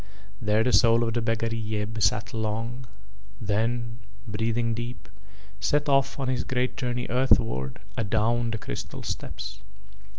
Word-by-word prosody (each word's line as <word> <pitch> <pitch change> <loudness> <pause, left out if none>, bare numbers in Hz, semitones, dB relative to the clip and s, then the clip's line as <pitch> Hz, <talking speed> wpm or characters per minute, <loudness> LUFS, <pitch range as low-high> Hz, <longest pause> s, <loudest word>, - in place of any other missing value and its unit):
There 105 0 +3
the 125 0 +2
soul 115 +3 +6
of 115 -1 0
the 120 - +1
beggar 115 0 0
Yeb 110 0 -2
sat 95 - +2
long, 115 +3 -2 0.5
then, 115 +2 -1 0.3
breathing 115 +2 0
deep, 120 +2 -5 0.5
set 145 +10 +2
off 135 -1 +3
on 135 - -1
his 130 -1 +1
great 125 0 0
journey 120 -1 -1
earthward 115 - +2 0.2
adown 115 +2 +1
the 115 - -1
crystal - - -6
steps. 100 +3 -5
115 Hz, 135 wpm, -27 LUFS, 110-120 Hz, 0.5 s, soul